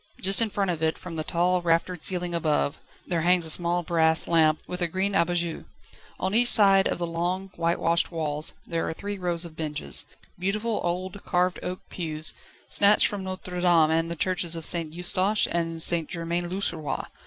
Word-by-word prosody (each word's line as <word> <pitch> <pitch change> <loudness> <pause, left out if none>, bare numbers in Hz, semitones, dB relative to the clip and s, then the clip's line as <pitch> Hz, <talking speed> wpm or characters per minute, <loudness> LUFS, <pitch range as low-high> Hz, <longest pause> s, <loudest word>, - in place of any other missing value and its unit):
Just 195 +4 +4
in 225 - +1
front 195 -2 -1
of 165 -2 -5
it, 160 0 0
from 180 -2 -9
the 155 - -3
tall, 180 +3 0
raftered 170 0 0
ceiling 180 -1 -1
above, 155 -2 -1 0.2
there 170 -2 -1
hangs 175 0 +3
a 160 - +3
small 175 +1 +1
brass 160 -1 +2
lamp, 155 -2 +3
with 180 0 -6
a 175 - +2
green 190 +4 -2
abat 175 -2 +1
jour. 170 -1 -3 0.7
Each 240 +2 +4
side 195 -4 +6
of - - -2
the 175 - -2
long, 175 +3 -3
whitewashed 170 -1 0
walls 155 -2 -3
there 165 -1 -3
are - - -3
three 205 +1 -6
rows 175 -1 -1
of 165 -2 -11
benches, 150 -2 -4 0.3
beautiful 210 +4 -2
old 185 +3 -4
carved 180 0 0
oak 180 0 -5
pews, 155 -3 +1 0.3
snatched 205 +1 +5
from 200 -2 -1
Notre 185 -1 -6
Dame 170 -3 +4
and 165 +1 +1
from - - -8
the 170 - -3
Churches 175 -1 0
of 165 -1 -1
St 165 -3 +1
Eustache 185 +4 +1
and 165 -1 -2
St 165 -3 +1
Germain 170 0 -3
l'Auxerrois. 175 -5 -1
175 Hz, 190 wpm, -25 LUFS, 165-185 Hz, 0.7 s, side